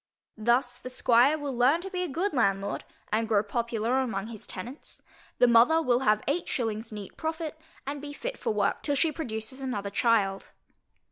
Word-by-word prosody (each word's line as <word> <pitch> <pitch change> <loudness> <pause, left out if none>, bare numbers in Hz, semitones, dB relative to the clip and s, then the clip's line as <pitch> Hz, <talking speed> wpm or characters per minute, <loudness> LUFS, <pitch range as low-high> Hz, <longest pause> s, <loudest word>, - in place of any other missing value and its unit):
Thus 245 +2 +1
the 255 - -7
squire 255 +3 +4
will 285 -3 -4
learn 260 +8 +4
to 385 +1 -6
be 365 -1 -2
a 360 - -1
good 340 +6 -1
landlord, 200 -5 0 0.3
and 225 +1 +1
grow 210 -2 +3
popular 235 +3 0
among 220 -5 -2
his 220 -3 -9
tenants, 245 +10 -8 0.3
the - - +6
mother 240 +7 +6
will 250 -6 +2
have 215 -5 +2
eight 325 +5 0
shillings 225 -2 -2
neat 205 -2 -8
profit, 320 -1 -3 0.3
and 285 +1 -4
be 290 0 -6
fit - - -5
for 460 - -1
work - - 0
till 290 - +1
she 320 +3 +2
produces 250 -4 -5
another 205 -7 -3
child. 200 -3 +1
245 Hz, 185 wpm, -28 LUFS, 220-290 Hz, 0.3 s, the